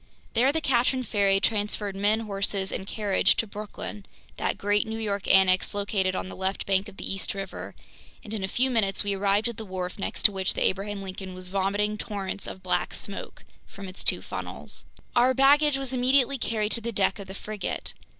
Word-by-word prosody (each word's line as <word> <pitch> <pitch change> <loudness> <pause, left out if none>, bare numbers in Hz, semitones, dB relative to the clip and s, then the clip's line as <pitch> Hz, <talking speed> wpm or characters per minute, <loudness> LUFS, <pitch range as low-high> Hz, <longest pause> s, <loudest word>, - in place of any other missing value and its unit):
There 255 +4 +4
the 320 +2 -1
Katrin 255 -1 +2
ferry 200 -3 +3
transferred 205 -1 0
men, 205 +3 +2
horses, 195 -2 -1
and 190 - -4
carriage 205 -3 +2
to - - 0
Brooklyn, 210 0 -7 0.3
that - - 0
great 205 +1 +1
New 220 0 -3
York 200 -3 -2
annex 190 0 +5
located 195 -2 0
on - - -3
the - - -8
left 190 +1 -2
bank 195 +1 +1
of 195 - -15
the - - -5
East 195 +1 -2
River, 195 -1 -6 0.5
and 215 - -7
in 210 -3 -3
a - - 0
few 255 +6 +1
minutes 210 -5 +2
we 200 -1 -1
arrived 200 +3 +2
at 235 -2 -5
the 225 - -5
wharf 185 -1 -5
next - - -4
to - - +8
which 190 -1 0
the - - +1
Abraham 200 +1 -1
Lincoln 185 -1 -7
was 185 0 -5
vomiting 205 +2 0
torrents 200 -3 -4
of 190 - -8
black 185 - 0
smoke - - -6 0.2
from 200 -1 -9
its 185 - -7
two - - +3
funnels. - - -7 0.3
Our 250 +2 +5
baggage 285 +2 +5
was 270 -1 -3
immediately 260 +1 +3
carried 215 -2 0
to 230 - +3
the 235 +1 -3
deck 200 -1 +1
of 200 - -7
the 190 - -8
frigate. 210 0 -4
205 Hz, 205 wpm, -27 LUFS, 195-225 Hz, 0.5 s, to